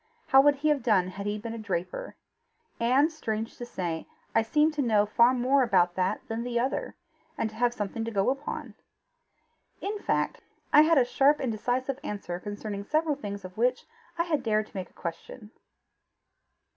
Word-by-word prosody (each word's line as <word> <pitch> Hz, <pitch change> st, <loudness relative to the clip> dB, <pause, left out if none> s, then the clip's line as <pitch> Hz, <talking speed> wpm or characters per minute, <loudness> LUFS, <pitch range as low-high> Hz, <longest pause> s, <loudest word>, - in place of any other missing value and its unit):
How 270 Hz, 0 st, +7 dB
would 290 Hz, +1 st, +5 dB
he 295 Hz, +2 st, 0 dB
have 295 Hz, -3 st, +2 dB
done 200 Hz, -6 st, +2 dB
had 200 Hz, +2 st, -6 dB
he 205 Hz, 0 st, -1 dB
been 225 Hz, +2 st, -6 dB
a 230 Hz, -, -6 dB
draper? 210 Hz, -, -4 dB, 0.6 s
And, 265 Hz, +7 st, +3 dB
strange 225 Hz, -7 st, -4 dB
to 240 Hz, -, -6 dB
say, 170 Hz, -7 st, -4 dB, 0.3 s
I -, -, +4 dB
seemed 300 Hz, +7 st, +2 dB
to 295 Hz, -, -1 dB
know 215 Hz, -5 st, +3 dB
far 235 Hz, +4 st, +5 dB
more 260 Hz, +2 st, +3 dB
about 180 Hz, -8 st, +3 dB
that 185 Hz, +1 st, -1 dB
than 225 Hz, +1 st, -3 dB
the 240 Hz, 0 st, -1 dB
other, 260 Hz, +3 st, -2 dB, 0.4 s
and 220 Hz, -, -1 dB
to -, -, -14 dB
have 240 Hz, 0 st, +3 dB
something 225 Hz, 0 st, -4 dB
to -, -, -2 dB
go 200 Hz, +1 st, +1 dB
upon. 275 Hz, +2 st, -5 dB, 1.1 s
In 415 Hz, +1 st, -3 dB
fact -, -, -1 dB, 0.3 s
I 300 Hz, -, +9 dB
had 320 Hz, +1 st, +4 dB
a 255 Hz, -, +5 dB
sharp 280 Hz, +4 st, +3 dB
and 255 Hz, -, -1 dB
decisive 255 Hz, +5 st, -2 dB
answer 180 Hz, -4 st, -4 dB
concerning 205 Hz, 0 st, -5 dB
several 310 Hz, +7 st, +1 dB
things 200 Hz, -7 st, -6 dB
of 185 Hz, +1 st, -10 dB
which 250 Hz, +2 st, +1 dB, 0.3 s
I 335 Hz, -, +2 dB
had 320 Hz, -5 st, 0 dB
dared 215 Hz, -3 st, +1 dB
to -, -, -23 dB
make 190 Hz, -1 st, -5 dB
a -, -, -30 dB
question." 200 Hz, +6 st, -7 dB
230 Hz, 190 wpm, -28 LUFS, 205-275 Hz, 1.1 s, I